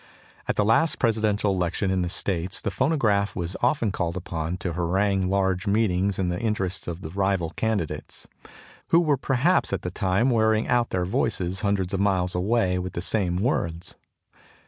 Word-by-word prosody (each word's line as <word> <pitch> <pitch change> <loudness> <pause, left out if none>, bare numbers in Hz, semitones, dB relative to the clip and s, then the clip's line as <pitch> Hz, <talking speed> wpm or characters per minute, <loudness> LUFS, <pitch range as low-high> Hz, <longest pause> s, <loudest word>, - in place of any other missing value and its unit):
At - - 0
the 105 - +2
last 115 +10 +3
Presidential 110 -3 +1
Election 95 +1 -1
in 95 -1 +1
the 90 - -1
States 90 -1 -1
the 100 - -3
phonograph 110 - +1
was 85 0 -3
often 120 -4 +1
called 85 -2 -2
upon 85 0 -4
to 90 -2 -4
harangue 95 +2 0
large 95 -1 0
meetings 100 -2 +1
in 95 -2 0
the 90 0 -2
interests 100 -5 -2
of 85 +1 -5
the 80 - -7
rival 95 -3 0
candidates, 110 -5 -3 0.6
who 165 - +5
were 155 -4 +2
perhaps 135 +6 +1
at 100 -1 -2
the 90 - -3
time 100 +7 +1
wearing 110 -1 +2
out 120 -1 +2
their 90 -1 -1
voices 95 -1 0
hundreds 100 -3 0
of 95 - 0
miles 95 -3 +1
away 95 0 +1
with 90 0 -5
the 85 - -3
same 90 -2 0
words. 85 - -2
95 Hz, 175 wpm, -25 LUFS, 90-110 Hz, 0.6 s, who